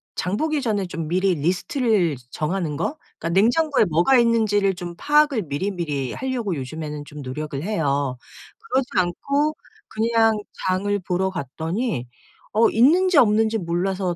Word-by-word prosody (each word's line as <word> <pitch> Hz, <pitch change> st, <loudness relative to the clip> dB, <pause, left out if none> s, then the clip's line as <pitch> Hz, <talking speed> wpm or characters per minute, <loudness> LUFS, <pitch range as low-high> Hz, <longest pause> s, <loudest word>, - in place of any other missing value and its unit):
장 190 Hz, +3 st, -2 dB
보기 310 Hz, 0 st, 0 dB
전에 210 Hz, -6 st, 0 dB
좀 165 Hz, -3 st, -5 dB
미리 185 Hz, +2 st, +1 dB
리스트를 180 Hz, -, +1 dB, 0.2 s
정하는 155 Hz, -2 st, -2 dB
거? 225 Hz, -, -2 dB, 0.2 s
그러니까 165 Hz, -, -3 dB
냉장고에 275 Hz, +5 st, +3 dB
뭐가 175 Hz, +10 st, +3 dB
있는지를 215 Hz, -5 st, +2 dB
좀 175 Hz, 0 st, -6 dB
파악을 295 Hz, -5 st, +3 dB
미리미리 150 Hz, -4 st, -3 dB
하려고 245 Hz, -8 st, -2 dB
요즘에는 150 Hz, +2 st, -6 dB
좀 145 Hz, 0 st, -9 dB
노력을 140 Hz, +2 st, -5 dB
해요. 145 Hz, -9 st, -1 dB, 0.5 s
그러지 260 Hz, -1 st, +1 dB
않고 280 Hz, -, 0 dB, 0.3 s
그냥 225 Hz, 0 st, +2 dB, 0.3 s
장을 200 Hz, +2 st, +1 dB
보러 185 Hz, 0 st, -1 dB
갔더니 165 Hz, -, -3 dB, 0.5 s
어 225 Hz, +2 st, +4 dB
있는지 335 Hz, +9 st, +4 dB
없는지 220 Hz, -2 st, +4 dB
몰라서 180 Hz, 0 st, -1 dB
190 Hz, 320 characters per minute, -22 LUFS, 160-230 Hz, 0.5 s, 어